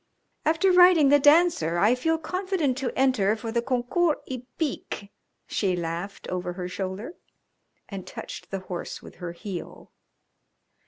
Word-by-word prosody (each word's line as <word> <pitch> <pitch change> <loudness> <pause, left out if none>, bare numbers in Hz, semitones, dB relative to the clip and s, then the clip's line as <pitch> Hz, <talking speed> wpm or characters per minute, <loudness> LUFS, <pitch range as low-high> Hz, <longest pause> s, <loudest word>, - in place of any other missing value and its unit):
"After 330 +5 +3
riding 355 -5 +7
The 290 +1 +6
Dancer 290 - +4
I 210 +7 +4
feel 325 +6 +1
confident 360 -4 -1
to 265 - -1
enter 255 -6 +3
for 225 0 -5
the 235 0 +1
Concours 265 +6 +1
Hippique," 250 -4 -5 0.3
she 190 -3 0
laughed 170 +3 -5
over 180 -1 -3
her 180 0 -5
shoulder, 190 - -5 0.7
and 195 -3 -7
touched - - -8
the 195 -1 -4
horse 180 -2 -6
with - - -13
her 175 -2 -6
heel. 180 0 -8
245 Hz, 140 wpm, -26 LUFS, 190-315 Hz, 0.7 s, riding